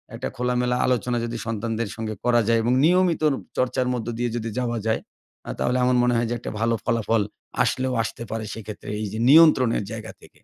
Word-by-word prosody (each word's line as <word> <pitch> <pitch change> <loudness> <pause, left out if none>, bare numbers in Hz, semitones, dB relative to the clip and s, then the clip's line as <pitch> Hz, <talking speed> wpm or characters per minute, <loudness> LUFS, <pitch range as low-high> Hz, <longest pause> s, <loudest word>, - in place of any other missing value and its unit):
একটা - - -4
খোলামেলা 125 0 0
আলোচনা 125 -1 0
যদি 120 0 -4
সন্তানদের 115 0 -2
সঙ্গে 110 -1 -4
করা 120 -1 +4
যায় 115 0 +3
এবং 120 +2 +2
নিয়মিতর 170 -3 +3 0.3
চর্চার 125 0 0
মধ্য 120 -2 -4
দিয়ে 120 0 0
যদি 115 -1 -3
যাওয়া 120 -2 -1
যায়? 110 - +1 0.5
আ - - -6
তাহলে 125 +1 +1
আমার 125 0 +3
মনে 125 0 +2
হয় 115 0 0
যে, - - -1
একটা - - -6
ভালো 115 0 +2
ফলাফল 115 -1 +1 0.4
আসলেও 130 0 0
আসতে 115 - -6
পারে 110 -1 -3
সেক্ষেত্রে, 105 -1 -8
এইযে 105 +2 -4
নিয়ন্ত্রণের 140 -8 +6
জায়গা 110 - -7
থেকে। - - -17
120 Hz, 190 wpm, -24 LUFS, 115-125 Hz, 0.5 s, নিয়ন্ত্রণের